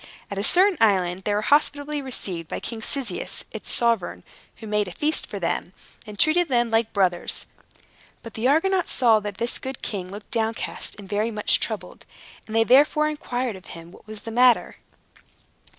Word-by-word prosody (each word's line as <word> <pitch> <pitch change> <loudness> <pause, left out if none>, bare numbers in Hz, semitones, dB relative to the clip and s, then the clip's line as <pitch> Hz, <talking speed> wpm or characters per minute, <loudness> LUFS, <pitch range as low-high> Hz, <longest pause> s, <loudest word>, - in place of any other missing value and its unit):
At 200 - -3
a - - -1
certain 365 - +4
island, 190 -4 +2
they 205 - +1
were 210 - 0
hospitably 290 +2 +1
received 190 - -4
by - - -4
King 230 -2 -6
Cyzicus, 240 -5 -3
its - - -6
sovereign, 230 - 0 0.3
who 225 - -11
made 210 -1 0
a - - -6
feast 300 - +1
for - - -6
them, - - -2 0.3
and 210 -1 -9
treated 335 - +4
them 240 -3 +1
like 225 0 +2
brothers. 180 -3 0 0.8
But 230 - -9
the 225 +3 0
Argonauts 360 +6 +2
saw 230 -4 +4
that 205 -2 -6
this 235 +1 -2
good 265 -1 -7
king 185 -4 -4
looked 205 +2 -10
downcast 225 0 -1
and 200 -2 -10
very 210 +3 0
much 210 -2 +1
troubled, - - -5 0.4
and 220 - -6
they 225 - +5
therefore 295 +5 +4
inquired 250 -6 -3
of 185 - -13
him 165 +1 -12
what 215 - -17
was 215 -1 -8
the 225 - -6
matter. 245 +1 +4
225 Hz, 180 wpm, -24 LUFS, 205-265 Hz, 0.8 s, they